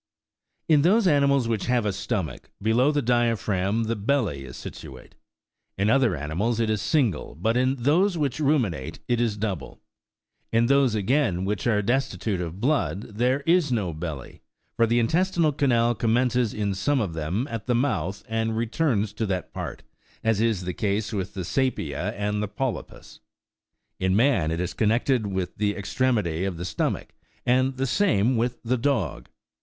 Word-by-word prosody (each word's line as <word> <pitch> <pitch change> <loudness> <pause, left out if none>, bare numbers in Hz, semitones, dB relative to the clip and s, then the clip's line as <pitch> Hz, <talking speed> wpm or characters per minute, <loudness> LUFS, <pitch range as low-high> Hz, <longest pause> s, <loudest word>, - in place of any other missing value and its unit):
In 150 -3 +5
those 200 +7 +4
animals 140 -6 +3
which 110 -4 -1
have 125 -3 +2
a 105 - 0
stomach, 95 -3 -4
below 120 +7 +3
the 145 -1 0
diaphragm 115 -3 +1
the 115 +1 -1
belly 105 - 0
is 60 - -9
situate. 65 -1 -10 0.6
In 100 +3 +2
other 125 -8 +3
animals 90 +11 -1
it 110 -1 +1
is 105 - -1
single, 130 - 0
but 110 +8 0
in 130 +2 +2
those 165 +9 +2
which 145 -2 -1
ruminate 125 - 0
it 120 -1 +1
is 110 -3 0
double; 100 -8 -4 0.7
in 115 +1 +3
those, 135 -3 +3
again, 105 -4 +1
which 105 +4 -2
are 105 -3 +2
destitute 115 -4 -1
of 85 +2 -5
blood, 105 - -1
there 130 +3 +2
is 165 -1 +2
no 100 -8 0
belly, 80 -4 -7 0.3
for 115 -1 +3
the 120 +2 +2
intestinal 165 +6 +2
canal 120 -5 +2
commences 120 +1 +1
in 105 -2 -1
some 140 +9 +1
of 100 -8 -2
them 85 - -2
at 115 -1 -5
the 125 - +2
mouth, 100 - -1
and 110 0 -1
returns 115 -3 0
to 110 +1 -2
that 95 -2 -3
part, - - -6 0.4
as 115 -2 +2
is 110 -5 +1
the 90 0 -3
case 105 +3 -1
with 95 -1 -3
the 95 -3 -4
saepia 90 - -1
and 105 0 -2
the 105 - -1
polypus. 130 +4 -5 0.8
In 95 0 +1
man 110 - +3
it 80 +1 -2
is 90 +1 -2
connected 115 +1 +1
with 95 -2 -3
the 105 0 0
extremity 100 -5 0
of 95 -3 -2
the 90 - -5
stomach, - - -2 0.4
and 130 +1 +2
the 135 - 0
same 130 - +2
with 120 +1 -1
the 125 +2 0
dog. 110 - -1
115 Hz, 170 wpm, -25 LUFS, 95-130 Hz, 0.8 s, In